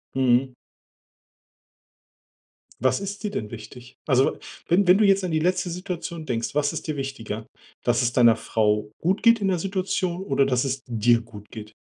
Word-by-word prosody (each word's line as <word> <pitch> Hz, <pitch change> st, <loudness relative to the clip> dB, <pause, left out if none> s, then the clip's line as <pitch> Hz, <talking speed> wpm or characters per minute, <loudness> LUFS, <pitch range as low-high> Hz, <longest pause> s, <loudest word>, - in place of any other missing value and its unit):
Mhm. 130 Hz, 0 st, +2 dB, 2.3 s
Was 130 Hz, +7 st, +2 dB
ist 200 Hz, +2 st, -6 dB
dir 210 Hz, -, -2 dB
denn 110 Hz, -, -4 dB
wichtig? 120 Hz, +2 st, -11 dB
Also, 130 Hz, -1 st, +3 dB, 0.3 s
wenn 180 Hz, +2 st, +3 dB
wenn 185 Hz, +3 st, +6 dB
du 215 Hz, -, +5 dB
jetzt 195 Hz, -1 st, +4 dB
an 180 Hz, -, -2 dB
die 155 Hz, -, +1 dB
letzte 180 Hz, +2 st, 0 dB
Situation 170 Hz, -2 st, -6 dB
denkst, 115 Hz, -2 st, -2 dB
was 145 Hz, 0 st, +1 dB
ist -, -, -5 dB
dir 155 Hz, -, -2 dB
wichtiger? 115 Hz, -6 st, -5 dB, 0.4 s
Dass 120 Hz, +1 st, +2 dB
es 120 Hz, 0 st, 0 dB
deiner 120 Hz, -3 st, +6 dB
Frau 105 Hz, -2 st, 0 dB
gut 190 Hz, +6 st, 0 dB
geht 230 Hz, 0 st, +6 dB
in 195 Hz, -, +1 dB
der 185 Hz, -2 st, +1 dB
Situation 185 Hz, -1 st, -2 dB
oder, 135 Hz, -4 st, +2 dB
dass 125 Hz, -2 st, +1 dB
es 135 Hz, -1 st, -2 dB
dir 120 Hz, 0 st, +2 dB
gut 105 Hz, -2 st, -13 dB
geht? 110 Hz, -2 st, -10 dB
135 Hz, 175 wpm, -24 LUFS, 120-180 Hz, 2.3 s, wenn